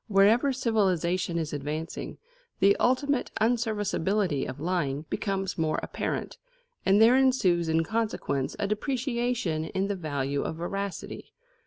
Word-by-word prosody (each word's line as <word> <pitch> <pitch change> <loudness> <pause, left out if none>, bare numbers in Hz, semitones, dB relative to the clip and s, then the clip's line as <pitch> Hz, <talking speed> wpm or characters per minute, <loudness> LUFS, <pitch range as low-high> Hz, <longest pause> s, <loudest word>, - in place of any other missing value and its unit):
Wherever 215 +6 +4
civilisation 185 -8 +1
is 160 -2 -2
advancing, 150 +3 -4 0.4
the 200 +1 +5
ultimate 270 +2 +1
unserviceability 210 - 0
of 130 - -7
lying 155 -4 -1
becomes 195 -1 -1
the - - -4
more 155 -1 +1
apparent, - - -4 0.4
and 195 +2 +4
there 230 +3 +7
ensues 190 -11 +3
in 160 +1 +2
consequence 210 -10 -2
a - - -1
depreciation 235 - -1
in 190 +4 -2
the 200 - 0
value 145 -5 -2
of - - -3
veracity. 195 +4 -5
195 Hz, 130 wpm, -28 LUFS, 160-225 Hz, 0.4 s, there